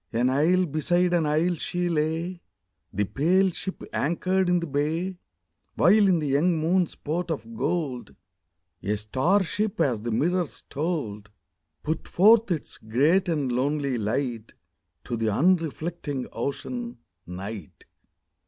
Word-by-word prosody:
r 115 Hz, -, -1 dB
An 125 Hz, +2 st, +3 dB
isle 170 Hz, +7 st, +3 dB
beside 175 Hz, +3 st, +1 dB
an 165 Hz, -3 st, +2 dB
isle 160 Hz, +4 st, +2 dB
she 175 Hz, +2 st, -1 dB
lay, 165 Hz, +2 st, -1 dB, 0.5 s
The 100 Hz, -, 0 dB
pale 175 Hz, -, +2 dB
ship 190 Hz, +2 st, -4 dB
anchored 185 Hz, +4 st, 0 dB
in 180 Hz, 0 st, +3 dB
the 170 Hz, -, -3 dB
bay, 160 Hz, +5 st, -2 dB, 0.6 s
While 210 Hz, -1 st, +5 dB
in 185 Hz, -2 st, +4 dB
the 150 Hz, -3 st, -2 dB
young 160 Hz, +5 st, +2 dB
moon's 170 Hz, +2 st, +1 dB
port 170 Hz, +4 st, -3 dB
of 225 Hz, +9 st, -5 dB
gold 150 Hz, -, -2 dB, 0.7 s
A 105 Hz, +3 st, -1 dB
star 130 Hz, -, +2 dB
ship 205 Hz, +3 st, -2 dB
as 125 Hz, -9 st, +1 dB
the 120 Hz, -, -4 dB
mirrors 170 Hz, +8 st, -1 dB
told 135 Hz, -, -3 dB, 0.5 s
Put 160 Hz, +2 st, -3 dB
forth 220 Hz, +4 st, +5 dB
its 165 Hz, -5 st, -3 dB
great 150 Hz, -, +2 dB
and 145 Hz, -6 st, 0 dB
lonely 140 Hz, 0 st, 0 dB
light 115 Hz, +1 st, -2 dB, 0.5 s
To 120 Hz, -, -3 dB
the 115 Hz, -1 st, 0 dB
unreflecting 160 Hz, -, 0 dB
Ocean, 240 Hz, -, -4 dB, 0.3 s
Night. 95 Hz, 0 st, -8 dB
160 Hz, 135 wpm, -26 LUFS, 130-180 Hz, 0.7 s, While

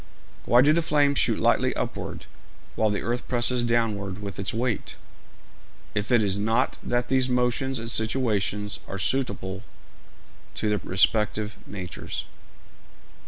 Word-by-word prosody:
Why 120 Hz, +2 st, +6 dB
do 150 Hz, +2 st, +5 dB
the 170 Hz, -, +3 dB
flames 145 Hz, -3 st, +3 dB
shoot -, -, +3 dB
lightly -, -, +2 dB
upward, -, -, -4 dB, 0.5 s
while 110 Hz, -, +2 dB
the 105 Hz, -, -2 dB
earth 120 Hz, +3 st, -2 dB
presses 125 Hz, 0 st, +1 dB
downward 110 Hz, -5 st, 0 dB
with 100 Hz, -2 st, -6 dB
its 95 Hz, -, -2 dB
weight, 115 Hz, -2 st, -2 dB, 1.0 s
if 105 Hz, +3 st, -2 dB
it 120 Hz, -3 st, +5 dB
is 100 Hz, -1 st, +1 dB
not 110 Hz, +2 st, +1 dB
that 120 Hz, 0 st, -1 dB
these 130 Hz, -1 st, +2 dB
motions 125 Hz, +2 st, +1 dB
and 115 Hz, -, -5 dB
situations 110 Hz, -3 st, 0 dB
are 95 Hz, -, -5 dB
suitable 100 Hz, -5 st, -2 dB, 0.9 s
to 110 Hz, -, -1 dB
their 105 Hz, -1 st, 0 dB
respective 105 Hz, +3 st, +1 dB
natures? 90 Hz, -5 st, -5 dB
110 Hz, 135 wpm, -26 LUFS, 100-125 Hz, 1.0 s, Why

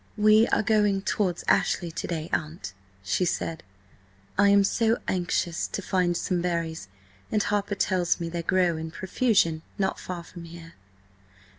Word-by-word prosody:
"We 215 Hz, +2 st, +5 dB
are -, -, +1 dB
going 210 Hz, -2 st, +2 dB
towards 185 Hz, -4 st, -1 dB
Ashley 175 Hz, -2 st, +2 dB
to 160 Hz, -, -5 dB
day, 160 Hz, -2 st, -3 dB
aunt," 155 Hz, -, -3 dB, 0.3 s
she 100 Hz, -, 0 dB
said. 165 Hz, -2 st, -2 dB, 0.7 s
"I 200 Hz, +1 st, +5 dB
am 200 Hz, 0 st, +6 dB
so 225 Hz, +3 st, +2 dB
anxious 175 Hz, -1 st, -1 dB
to -, -, -4 dB
find 180 Hz, -2 st, +1 dB
some 180 Hz, -2 st, -1 dB
berries, 165 Hz, -, -2 dB, 0.4 s
and 215 Hz, -2 st, +2 dB
Harper 205 Hz, 0 st, -1 dB
tells 185 Hz, -3 st, +1 dB
me 170 Hz, -, -3 dB
they 170 Hz, 0 st, -3 dB
grow 180 Hz, -1 st, +2 dB
in 160 Hz, 0 st, -5 dB
profusion 185 Hz, -2 st, +1 dB, 0.2 s
not 190 Hz, -2 st, -1 dB
far 180 Hz, -2 st, -6 dB
from 170 Hz, 0 st, -11 dB
here." 165 Hz, 0 st, -11 dB
180 Hz, 155 wpm, -26 LUFS, 170-200 Hz, 0.7 s, am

